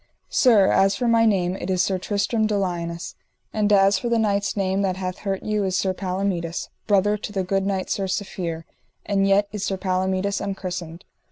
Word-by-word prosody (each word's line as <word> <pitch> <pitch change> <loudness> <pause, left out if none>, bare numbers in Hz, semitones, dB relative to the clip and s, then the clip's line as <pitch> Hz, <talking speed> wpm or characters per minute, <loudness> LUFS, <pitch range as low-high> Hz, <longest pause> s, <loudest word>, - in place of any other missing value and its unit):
Sir, 225 -7 +5
as 195 +1 +3
for 245 - -1
my 230 -1 +4
name 185 -3 +1
it 190 - -6
is 185 -1 +2
Sir 190 -1 0
Tristram 210 +3 0
de 210 -1 0
Liones, 170 -3 -3 0.4
and 210 -1 +1
as 195 -1 +5
for 240 - -3
the 235 - +2
knight's 205 -2 0
name 195 0 0
that 190 -2 0
hath 185 -1 -4
hurt 195 -2 -3
you 210 -1 0
is 185 -1 0
Sir 190 -1 0
Palomides, 180 -3 -3 0.2
brother 205 +1 +3
to 210 - -7
the 195 -2 -1
good 195 +1 0
knight 190 -2 -2
Sir 195 - 0
Safere, 175 -4 -3 0.4
and 195 -1 +1
yet 200 +1 +3
is 210 -2 -4
Sir 195 - -1
Palomides 190 +1 -1
unchristened. 185 -3 -5
195 Hz, 195 wpm, -23 LUFS, 185-205 Hz, 0.4 s, Sir